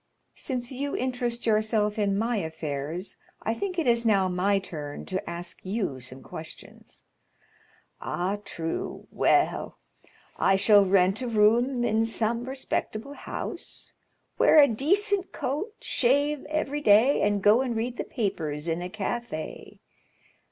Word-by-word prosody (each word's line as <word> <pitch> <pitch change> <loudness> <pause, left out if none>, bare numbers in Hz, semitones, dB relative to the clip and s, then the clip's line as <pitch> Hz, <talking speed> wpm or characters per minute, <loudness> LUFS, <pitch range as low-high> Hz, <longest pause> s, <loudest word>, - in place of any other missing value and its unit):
"Since 250 -2 -4
you 280 +2 -3
interest 245 -2 -2
yourself 215 -1 +1
in 200 -1 +1
my 230 +2 0
affairs, 160 0 -4 0.3
I 225 - 0
think 365 +8 -4
it 330 - +1
is 235 -1 +3
now 200 -4 +3
my 185 +3 +1
turn 150 -6 -6
to 185 - -4
ask 170 0 -6
you 190 - -2
some 130 +1 -9
questions." 160 0 -11 1.0
"Ah, 190 +4 -2
true. 165 -4 -5
Well; - - +1 0.6
I 195 - +4
shall 205 +1 +6
rent 190 +2 +3
a 250 - -2
room 235 +3 +3
in 225 -1 +2
some 230 +1 -1
respectable 265 -1 -3
house, - - -5 0.5
wear - - +6
a 285 - +8
decent 385 - +1
coat, 300 - -3
shave 285 +3 +1
every 295 -1 -2
day, 225 +4 +5
and 205 -1 +1
go 215 +4 +6
and 250 -3 -2
read 235 +2 -2
the - - -2
papers 160 - -3
in 165 +1 -1
a 180 - -4
café. 215 -4 -5
220 Hz, 135 wpm, -27 LUFS, 190-255 Hz, 1.0 s, a